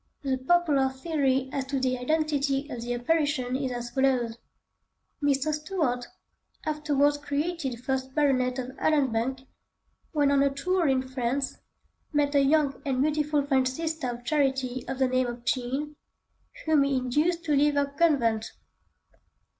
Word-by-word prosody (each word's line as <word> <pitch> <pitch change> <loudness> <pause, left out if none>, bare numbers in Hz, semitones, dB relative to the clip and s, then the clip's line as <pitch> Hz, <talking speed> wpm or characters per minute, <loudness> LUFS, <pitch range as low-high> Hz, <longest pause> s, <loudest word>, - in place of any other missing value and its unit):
The 265 -2 0
popular 285 -2 +3
theory 265 -1 0
as 275 -1 -2
to 270 0 -2
the 255 -1 0
identity 285 0 0
of 240 - -5
the 245 +1 -2
apparition 275 -1 0
is 265 -1 -2
as 240 -1 -5
follows:— 245 -3 +1 0.8
Mr. 285 +1 +1
Stuart, 300 -6 -2 0.6
afterwards 290 -1 +1
created 290 -2 -2
first 265 0 -2
baronet 260 -4 +2
of 255 -1 -4
Allanbank, 265 -3 +1 0.7
when 290 -3 +2
on 280 -1 +4
a 280 - +4
tour 340 +5 0
in 265 -1 +2
France, 260 +1 -2 0.5
met 295 -1 +1
a 280 - +5
young 285 -1 +2
and 270 -4 -1
beautiful 300 -1 +1
French 265 -2 +2
Sister 315 0 -3
of 240 0 -7
Charity 265 -3 0
of 265 - -3
the 265 -1 +3
name 255 0 +1
of 240 0 -7
Jean, 265 +5 -1 0.7
whom 315 -2 +4
he 275 -1 +2
induced 300 +7 0
to 300 -3 +1
leave 290 +1 +3
her 285 0 +3
convent. 280 -7 +1
275 Hz, 145 wpm, -27 LUFS, 255-300 Hz, 0.8 s, a